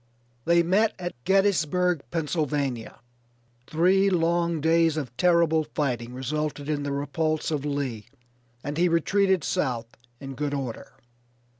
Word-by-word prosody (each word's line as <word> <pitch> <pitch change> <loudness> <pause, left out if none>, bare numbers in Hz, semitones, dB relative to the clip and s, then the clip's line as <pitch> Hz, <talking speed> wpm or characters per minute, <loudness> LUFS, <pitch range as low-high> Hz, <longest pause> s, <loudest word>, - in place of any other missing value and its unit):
They 170 0 +4
met 205 +6 +2
at 175 -1 -5
Gettysburgh, 180 -4 +2
Pennsylvania. 145 -8 -2 0.7
Three 185 +5 +3
long 170 -2 +1
days 165 0 +3
of 125 -5 -5
terrible 170 +1 +3
fighting 125 -4 -2
resulted 145 +2 -3
in 150 -1 -1
the 145 0 -3
repulse 155 +3 -1
of 145 -2 -2
Lee, 135 -7 -3 0.6
and 145 +2 -4
he 180 0 +4
retreated 190 +1 +2
south 120 -3 -2 0.2
in 135 -1 -7
good 145 +1 -2
order. 130 -5 -6
155 Hz, 125 wpm, -26 LUFS, 140-170 Hz, 0.7 s, They